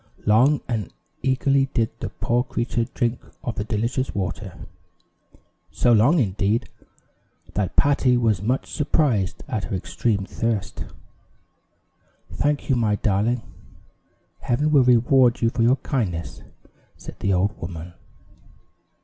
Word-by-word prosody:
Long 125 +8 +4
and 110 -7 -3 0.3
eagerly 135 +1 +2
did 115 -3 +1
the - - -4
poor 120 +1 0
creature 120 -1 -2
drink 120 +1 -2 0.2
of 120 - -2
the 105 - -3
delicious 115 +5 -2
water; 100 0 -4 1.1
so 120 - +2
long, 120 +10 +5
indeed, 105 - 0 0.9
that 100 -3 -2
Patty 135 -3 +3
was 110 -6 +1
much 125 +6 -1
surprised 130 - 0
at 110 -7 -2
her - - -3
extreme 100 +2 -1
thirst. 110 -2 -3 1.5
"Thank 145 0 -1
you, 135 - +2
my 110 -3 +2
darling. 105 +4 0 1.0
Heaven 150 +5 0
will 140 -3 +6
reward 125 0 +4
you 115 - +3
for 120 - -2
your 120 +3 +5
kindness," 100 - -3 0.6
said - - -10
the 100 - +1
old 95 +3 +1
woman. 85 0 -7
115 Hz, 125 wpm, -23 LUFS, 105-130 Hz, 1.5 s, will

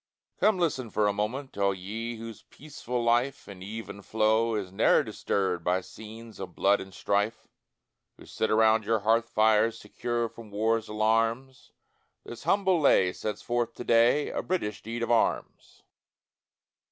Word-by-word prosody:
Come 215 -2 +3
listen 145 -9 -1
for 105 0 +1
a 100 - +1
moment, 110 +5 -4
All 100 -1 +2
ye, 110 +6 -5
whose 115 -1 -9
peaceful 125 -5 -6
life 120 +4 +1
In 95 -2 -10
even 100 0 -7
flow 110 +2 +1
is 100 -4 -4
ne'er 95 - +3
disturbed 95 -4 -2
By 90 +2 +1
scenes 110 +3 -12
of 90 -3 -7
blood 100 +1 +3
and 95 - -10
strife; 105 +4 -1 0.7
Who - - -14
sit 110 - -2
around 110 0 +4
your 110 0 0
hearth 115 +2 +2
fires, 110 +1 +3
Secure 120 +2 -3
from 115 -1 -13
war's 110 +2 0
alarms; 115 +4 -1 0.5
This 120 - -10
humble 190 -3 +2
lay 95 -10 +4
sets 105 - -5
forth 120 -1 -1
to - - -7
day 120 +5 +3
A - - -2
British 165 - -3
deed 115 +2 -5
of 115 - -1
arms. 115 - -1
110 Hz, 155 wpm, -28 LUFS, 105-120 Hz, 0.7 s, around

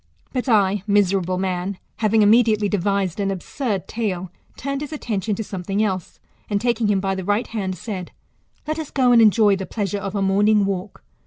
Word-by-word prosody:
But 255 0 -2
I, 205 -3 +3
miserable 195 -3 +2
man, 185 +1 -2 0.2
having 220 0 +3
immediately 215 -1 +4
devised 200 -2 0
an 200 -1 0
absurd 195 - -3
tale, 190 -6 -3 0.3
turned 275 +1 -3
his 295 0 -5
attention 215 -8 -2
to 220 - -3
something 195 +1 -2
else, 185 -4 -3 0.3
and, 205 -1 +1
taking 235 -1 +1
him 205 -2 +2
by 195 0 -1
the 190 0 -4
right 205 +5 +1
hand, 195 -4 -3
said. 190 -6 -6 0.6
Let 310 +1 -2
us 315 - -5
go, 255 -3 +3
and 235 -1 +7
enjoy 210 -2 +5
the 190 - -5
pleasure 205 -2 -2
of 195 +1 -5
a 200 - 0
morning 205 +2 +3
walk. 195 0 -4
205 Hz, 185 wpm, -22 LUFS, 190-220 Hz, 0.6 s, and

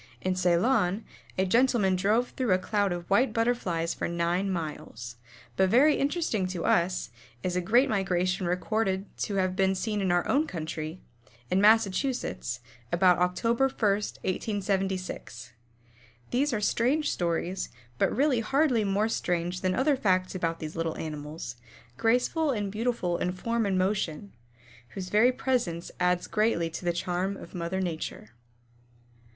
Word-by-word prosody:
In 185 - 0
Ceylon 185 +3 +2 0.3
a 190 - +2
gentlemen 230 -2 +3
drove 210 +6 +2
through 250 -7 0
a - - +4
cloud 205 +1 0
of 175 -1 -4
white 240 +7 +3
Butterflies 200 -8 0
for - - -3
nine 170 +3 0
miles. 150 -9 -5 0.4
But 190 +7 +3
very 280 +8 +6
interesting 275 - 0
to 180 -3 -4
us, 175 -4 +1 0.3
is 180 -1 -1
a 180 - +1
great 240 +9 +4
migration 185 -3 0
recorded 190 +2 -1
to 205 - -2
have 185 -1 +1
been 190 0 +2
seen 210 +1 -2
in 190 -2 +1
our 175 0 +2
own 300 +4 +2
country, 155 0 -5 0.5
in 185 +2 +3
Massachusetts, 210 - +2 0.3
about 180 0 +4
Oct. 180 +3 0
1, 230 0 +3 0.2
1876. 195 - -2 0.8
These 280 +4 +2
are 225 - 0
strange 255 +8 +1
stories, 175 +2 -2 0.3
but - - +3
really 275 -3 +2
hardly 255 0 +2
more 200 +2 +1
strange 175 -4 -1
than 185 -1 +1
other 280 +2 +3
facts 185 -7 +1
about 165 -3 -2
these 155 0 -6
little 165 -1 -2
animals, 150 -4 -6 0.4
graceful 250 +7 +2
and 205 -6 -1
beautiful 215 -5 -1
in 180 - -1
form 230 +3 -1
and 190 -1 +1
motion, 190 -1 -1 0.6
whose 185 -1 -5
very 220 +5 +5
presence 245 -10 -1
adds 180 0 +2
greatly 210 -6 +1
to 170 - -6
the 175 - +3
charm 180 +3 -2
of - - -11
mother 175 +1 -2
Nature. 165 - -4
190 Hz, 145 wpm, -28 LUFS, 175-225 Hz, 0.8 s, very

